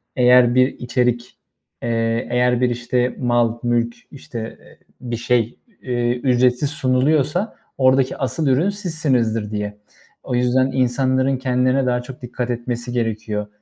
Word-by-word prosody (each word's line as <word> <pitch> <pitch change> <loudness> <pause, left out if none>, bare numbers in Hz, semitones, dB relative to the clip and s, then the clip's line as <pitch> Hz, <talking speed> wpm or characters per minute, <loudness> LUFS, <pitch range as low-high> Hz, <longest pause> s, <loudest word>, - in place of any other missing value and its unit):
eğer 125 -1 +5
bir 130 0 +5
içerik, 125 0 -1 0.5
eee, 115 0 -1
eğer 125 0 +2
bir 125 - +3
işte 120 +1 -1
mal, 120 -2 +1
mülk, 120 -1 0 0.2
işte, 115 -5 -7 0.4
bir 120 -2 -4
şey, 120 -1 0 0.2
eee, 120 -1 -1
ücretsiz 125 +2 +2
sunuluyorsa 150 - +1 0.2
oradaki 130 0 +3
asıl 135 +3 -1
ürün 145 +9 +3
sizsinizdir 130 - -1
diye. 105 -1 -4 0.5
O 125 - -3
yüzden 130 +2 +2
insanların 130 +1 +1
kendilerine 130 +1 +1
daha 125 -1 0
çok 130 +1 -11
dikkat 125 0 -4
etmesi 120 0 -3
gerekiyor. 110 -3 -2
125 Hz, 130 wpm, -20 LUFS, 120-130 Hz, 0.5 s, eğer